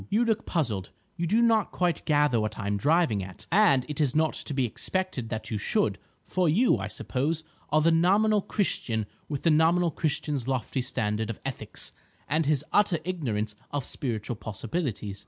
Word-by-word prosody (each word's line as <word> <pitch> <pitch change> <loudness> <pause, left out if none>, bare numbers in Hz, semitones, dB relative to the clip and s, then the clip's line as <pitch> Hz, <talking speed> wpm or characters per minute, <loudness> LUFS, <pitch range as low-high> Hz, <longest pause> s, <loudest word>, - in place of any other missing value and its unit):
"You 220 +5 +2
look 225 -2 0
puzzled. 115 - -1 0.3
You 170 -1 -2
do 225 +7 +3
not 225 -3 +3
quite 180 -2 0
gather 145 -6 +3
what 110 0 -3
I - - -5
am 100 0 0
driving 150 - +2
at; 95 -1 -10
and 175 -10 +5
it 150 0 -3
is 140 -3 +1
not 155 0 +2
to - - -7
be 135 -2 +2
expected 135 - -3
that 110 +1 -5
you 105 - -1
should, - - +1 0.2
for 180 -3 +1
you, 225 +11 +4
I - - -3
suppose, 150 +5 -2 0.3
are 155 +1 +3
the 165 +2 +4
nominal 200 +6 +4
Christian 115 - 0 0.2
with 145 -3 -3
the 165 - +4
nominal 165 +2 +4
Christian's 150 -4 -1
lofty 130 0 -1
standard 105 -2 -1
of 115 - -5
ethics, 120 -6 -6 0.4
and 155 +1 +1
his 150 -1 +1
utter 205 -4 +4
ignorance 110 - -2
of 145 -3 -3
spiritual 115 -3 -3
possibilities. 110 - -4
150 Hz, 180 wpm, -27 LUFS, 115-175 Hz, 0.4 s, and